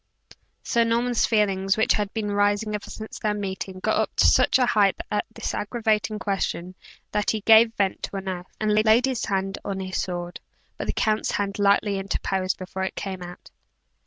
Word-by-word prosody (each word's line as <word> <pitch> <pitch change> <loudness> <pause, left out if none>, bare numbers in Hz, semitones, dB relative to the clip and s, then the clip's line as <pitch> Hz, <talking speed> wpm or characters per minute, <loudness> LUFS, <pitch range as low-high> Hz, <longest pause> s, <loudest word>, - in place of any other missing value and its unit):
Sir 235 -1 +2
Norman's 235 +1 +1
feelings, 195 -3 +1
which 220 - +3
had 205 -1 -1
been 215 -2 -3
rising 205 +1 +1
ever 210 - -5
since 220 0 -8
their 210 -1 0
meeting, 190 -2 -5
got - - +1
up - - -1
to - - +4
such - - +5
a 255 - +3
height 205 -5 +3 0.2
at 210 - 0
this - - -3
aggravating 215 -1 -1
question, 190 -3 -2 0.4
that 210 -1 0
he 220 - 0
gave 225 +2 +6
vent 195 -2 0
to - - -5
an 195 0 -5
oath, 180 -1 -5
and 215 -1 +1
laid 220 +3 +4
his 260 -3 -1
hand 195 -1 -2
on 195 -1 -3
his 190 0 -2
sword; 175 -1 -5 0.4
but - - -5
the - - 0
count's 215 -1 0
hand 200 0 -2
lightly 200 0 +3
interposed 190 -1 -2
before 185 0 -6
it 190 - -2
came 190 -2 -5
out. 175 0 -10
205 Hz, 190 wpm, -24 LUFS, 190-215 Hz, 0.4 s, gave